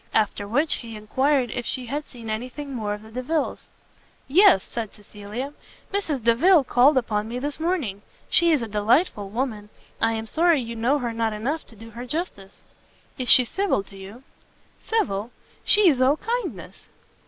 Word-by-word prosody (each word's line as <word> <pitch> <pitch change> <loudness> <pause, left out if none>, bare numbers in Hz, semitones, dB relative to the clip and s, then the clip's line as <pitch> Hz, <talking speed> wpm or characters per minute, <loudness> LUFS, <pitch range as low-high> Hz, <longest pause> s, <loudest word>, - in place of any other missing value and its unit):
After 205 -2 0
which, 285 +9 +1
he 230 -2 -9
enquired 260 +4 0
if 245 - -3
she 255 +1 -3
had 290 +5 -5
seen 235 -3 -11
any 220 +3 -3
thing 285 +1 -8
more 210 -4 -2
of 210 - -13
the 220 - -14
Delviles? 275 +6 -3 0.6
"Yes," 310 - +6
said 225 -3 -6
Cecilia, 210 +6 -7 0.4
"Mrs. 315 - -2
Delvile 285 +9 +5
called 260 +3 +4
upon 215 -4 0
me 235 +2 -5
this 285 +3 -4
morning. 310 - -2 0.3
She 340 -1 +4
is 295 -7 +2
a - - -4
delightful 210 - +1
woman; 220 -2 -3 0.3
I 225 0 +2
am 220 0 -4
sorry 330 +6 +3
you 235 -2 -5
know 240 +6 +1
her 240 -4 -3
not 225 -1 -1
enough 265 +10 -3
to 225 - -14
do 225 +2 -12
her 240 +3 -8
justice." 260 - -5 0.6
"Is 250 -2 -2
she 250 - +7
civil 385 - 0
to 195 - -15
you?" 195 +6 -11 0.6
"Civil? 220 - -1 0.3
she 405 0 +7
is 275 -6 +3
all 270 +4 +4
kindness!" 355 - -5
245 Hz, 175 wpm, -24 LUFS, 215-295 Hz, 0.6 s, she